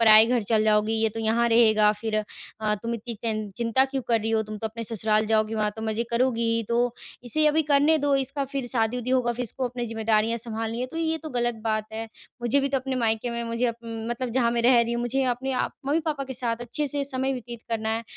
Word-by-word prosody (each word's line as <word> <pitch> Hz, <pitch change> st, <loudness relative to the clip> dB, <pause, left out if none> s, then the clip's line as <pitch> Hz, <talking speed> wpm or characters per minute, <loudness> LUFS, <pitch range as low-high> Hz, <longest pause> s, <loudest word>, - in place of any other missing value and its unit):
पराई 220 Hz, -1 st, +8 dB
घर 240 Hz, -1 st, +1 dB
चल 215 Hz, +1 st, +2 dB
जाओगी, 215 Hz, 0 st, +3 dB
ये 220 Hz, -, +3 dB
तो 225 Hz, -, -3 dB
यहाँ 230 Hz, +2 st, +2 dB
रहेगा 220 Hz, -2 st, +5 dB
फिर 220 Hz, -1 st, -1 dB
अ, 215 Hz, 0 st, -3 dB
तुम 230 Hz, 0 st, -2 dB
इतनी 230 Hz, +1 st, -6 dB
चिं 215 Hz, -1 st, -3 dB
चिंता 235 Hz, +3 st, +2 dB
क्यों 270 Hz, -1 st, -3 dB
कर 230 Hz, -2 st, +3 dB
रही 220 Hz, +1 st, -2 dB
हो? 220 Hz, -1 st, +2 dB
तुम 215 Hz, 0 st, -7 dB
तो 220 Hz, -, -2 dB
अपने 230 Hz, +1 st, -6 dB
ससुराल 215 Hz, -1 st, +1 dB
जाओगी, 220 Hz, 0 st, +1 dB
वहाँ 215 Hz, -1 st, +1 dB
तो 220 Hz, -, -6 dB
मज़े 220 Hz, +1 st, -1 dB
करोगी 235 Hz, 0 st, +1 dB
ही। 230 Hz, -, 0 dB
तो 240 Hz, +1 st, +1 dB, 0.3 s
इसे 305 Hz, +6 st, +2 dB
अभी 305 Hz, +1 st, +3 dB
करने 295 Hz, +3 st, +5 dB
दो, 285 Hz, -1 st, +2 dB
इसका 275 Hz, +1 st, -1 dB
फिर 275 Hz, -1 st, -4 dB
शादी-वादी 240 Hz, +1 st, 0 dB
होगा, 250 Hz, -2 st, +2 dB
फिर 245 Hz, +1 st, -4 dB
इसको 255 Hz, +2 st, -2 dB
अपनी 245 Hz, 0 st, -4 dB
ज़िम्मेदारियाँ 225 Hz, 0 st, +1 dB
संभालनी 225 Hz, 0 st, -3 dB
है। 250 Hz, -, -1 dB
तो -, -, -6 dB
ये 320 Hz, 0 st, 0 dB
तो -, -, -5 dB
गलत 240 Hz, 0 st, +1 dB
बात 215 Hz, -1 st, -1 dB
है, 225 Hz, +1 st, -5 dB, 0.3 s
मुझे 240 Hz, +4 st, +2 dB
भी 275 Hz, -, 0 dB
तो 270 Hz, 0 st, +1 dB
अपने 260 Hz, 0 st, -3 dB
मायके 225 Hz, +2 st, 0 dB
में 235 Hz, 0 st, -3 dB
मुझे 230 Hz, +1 st, 0 dB
मतलब 230 Hz, +2 st, -4 dB
जहाँ 235 Hz, -1 st, +2 dB
मैं 235 Hz, 0 st, 0 dB
रह 245 Hz, 0 st, +6 dB
रही 235 Hz, 0 st, 0 dB
हूँ, 235 Hz, -, -1 dB
मुझे 255 Hz, +3 st, 0 dB
अपने 265 Hz, +2 st, -4 dB
आप 255 Hz, -, -1 dB
मम्मी-पापा 300 Hz, -1 st, 0 dB
के 265 Hz, -, -6 dB
साथ 235 Hz, -2 st, -1 dB
अच्छे 240 Hz, +5 st, -2 dB
से 285 Hz, 0 st, -1 dB
समय 265 Hz, 0 st, -1 dB
व्यतीत 240 Hz, -2 st, -7 dB
करना 220 Hz, -1 st, -2 dB
है। 225 Hz, +1 st, -1 dB
235 Hz, 245 wpm, -25 LUFS, 220-255 Hz, 0.3 s, पराई